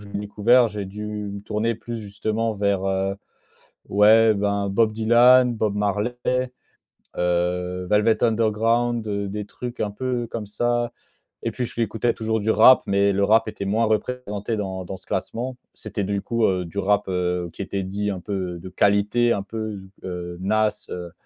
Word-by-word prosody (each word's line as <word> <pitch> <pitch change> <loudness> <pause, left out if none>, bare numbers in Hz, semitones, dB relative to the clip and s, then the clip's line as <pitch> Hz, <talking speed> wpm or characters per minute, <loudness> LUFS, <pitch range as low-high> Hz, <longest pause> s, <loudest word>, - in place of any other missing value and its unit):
je 100 - -12
l'ai 100 - -4
découvert, 110 +4 +4
j'ai 105 -1 -5
dû 105 +2 -7
me 105 -1 -5
tourner 110 +2 -1
plus 115 +1 -6
justement 110 +2 -2
vers, 100 -1 0
heu, 95 0 0 0.7
ouais, 110 +2 +6
ben 100 0 0
Bob 110 +2 +2
Dylan, 120 +3 +5
Bob 110 -2 -1
Marley, 105 +3 0 1.0
heu, 90 +1 -1
Velvet 105 +2 +3
Underground, 115 +1 +1
heu, 100 -1 -2
des 105 +1 -4
trucs 120 +3 -8
un 105 - -1
peu 120 +2 -2
comme 110 -2 -5
ça. 120 +3 0 0.5
Et - - 0
puis 125 - -3
j'écoutais 115 0 -1
toujours 110 0 -1
du 110 +2 +1
rap, 130 +3 +7
mais 100 0 +3
le 100 +1 +1
rap 110 +2 +4
était 105 -2 -5
moins 110 +4 +1
représenté 110 -1 -2
dans 95 -2 -4
dans 95 +2 -6
ce - - -22
classement. 125 +2 -3 0.2
C'était 105 -1 -5
du 100 +1 -1
coup, 115 +1 0
heu, 90 -2 +1
du 85 +4 -10
rap, 100 +1 +2
heu, 90 -1 -1
qui - - -7
était 100 0 -3
dit, 100 +2 -2
un 95 - -4
peu 90 -3 -4
de 95 +2 -9
qualité, 105 +5 +2
un 100 - -2
peu, 110 -1 -5 0.2
heu, 90 -1 -5
Nas, 110 +2 0
heu 90 -1 -6
105 Hz, 175 wpm, -23 LUFS, 100-115 Hz, 1.0 s, rap